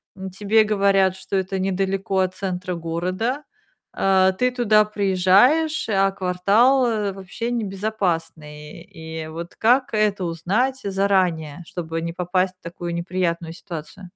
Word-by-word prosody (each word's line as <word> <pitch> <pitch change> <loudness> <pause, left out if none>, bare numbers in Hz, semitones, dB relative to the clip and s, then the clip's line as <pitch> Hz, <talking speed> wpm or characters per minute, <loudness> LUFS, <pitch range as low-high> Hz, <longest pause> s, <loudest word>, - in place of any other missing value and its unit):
м, 190 -1 -7
тебе 210 +3 +3
говорят, 195 -3 +2
что 190 +1 -6
это 190 0 -1
недалеко 195 0 -1
от 185 0 +1
центра 185 -1 -3
города, 185 - -2 0.5
а, 190 -1 +3
ты 250 +6 +1
туда 215 -4 +4
приезжаешь, 210 - +3
а 195 -1 +3
квартал, 200 +8 +3
э, 210 -4 -1
вообще 195 +5 -5
небезопасный, 185 -8 -3
и 160 -1 -8
вот 165 +2 -8
как 250 +4 +3
это 210 -3 +1
узнать 205 +11 -1
заранее, 185 -5 0
чтобы 165 -2 -5
не 165 0 -4
попасть 185 +1 -1
в - - -46
такую 170 0 -6
неприятную 170 -1 -2
ситуацию? 175 +2 -9
190 Hz, 130 wpm, -22 LUFS, 175-210 Hz, 0.5 s, туда